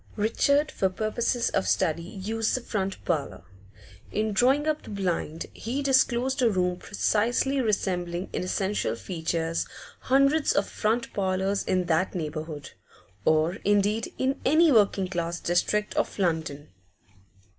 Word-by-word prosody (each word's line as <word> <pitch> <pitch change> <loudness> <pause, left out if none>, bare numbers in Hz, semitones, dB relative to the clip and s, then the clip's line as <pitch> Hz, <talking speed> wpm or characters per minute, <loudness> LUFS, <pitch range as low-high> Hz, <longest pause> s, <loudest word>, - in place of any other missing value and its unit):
Richard, 280 +8 +2
for 190 - +1
purposes 230 +5 -1
of 95 - 0
study, 150 - +1
used 210 +5 -2
the 255 - -2
front 195 -4 -3
parlour. 155 - -2 0.7
In 215 0 -1
drawing 265 +8 +3
up 310 -1 0
the - - -12
blind, 180 -5 -2
he 260 +6 -3
disclosed 265 0 +2
a 240 - +5
room 180 -3 0
precisely 235 +8 0
resembling 180 -5 -1
in - - -1
essential 190 - -1
features 165 +2 -2 0.3
hundreds 275 +3 +3
of 200 - +1
front 230 +3 -1
parlours 190 0 0
in 185 -1 +1
that 170 +3 0
neighbourhood, 155 -3 -5 0.5
or, 160 +3 +2
indeed, 205 +2 +1
in 265 +1 -1
any 315 +3 +5
working 200 -5 +3
class 170 -2 -3
district 210 +4 0
of - - -1
London. 160 -6 -1
195 Hz, 135 wpm, -26 LUFS, 170-235 Hz, 0.7 s, a